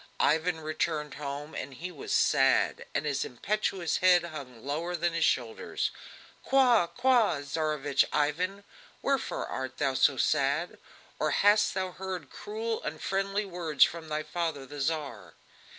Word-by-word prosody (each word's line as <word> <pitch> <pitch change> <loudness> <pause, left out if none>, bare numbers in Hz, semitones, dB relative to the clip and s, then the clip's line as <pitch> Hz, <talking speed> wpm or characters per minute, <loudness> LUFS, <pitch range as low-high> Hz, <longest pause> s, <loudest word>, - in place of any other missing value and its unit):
Ivan 160 +2 +2
returned 155 -1 -2
home, 145 +1 -6
and 135 -1 -6
he 180 +7 -6
was 145 -6 -8
sad, - - +3
and - - 0
his 145 -2 0
impetuous 190 - -1
head 180 -1 +5
hung 135 -8 -8
lower 165 +5 -2
than 175 0 0
his 165 - +1
shoulders. 115 -3 0 0.5
"Qua! 250 -8 +4
qua! 240 - +3
Tsarevich 145 -1 0
Ivan! 180 +7 0 0.4
wherefore 275 -3 0
art 130 0 -5
thou 135 - +1
so 135 +1 +3
sad? 140 +7 +1 0.4
Or - - +1
hast 205 -1 +4
thou 185 -1 -1
heard 185 -6 -6
cruel, 220 +2 -4
unfriendly 195 +6 -2
words 170 -6 +2
from 165 -1 -1
thy 155 0 -2
father 155 -3 -3
the 145 +2 -9
Tsar?" 135 - -3
160 Hz, 140 wpm, -29 LUFS, 145-185 Hz, 0.5 s, head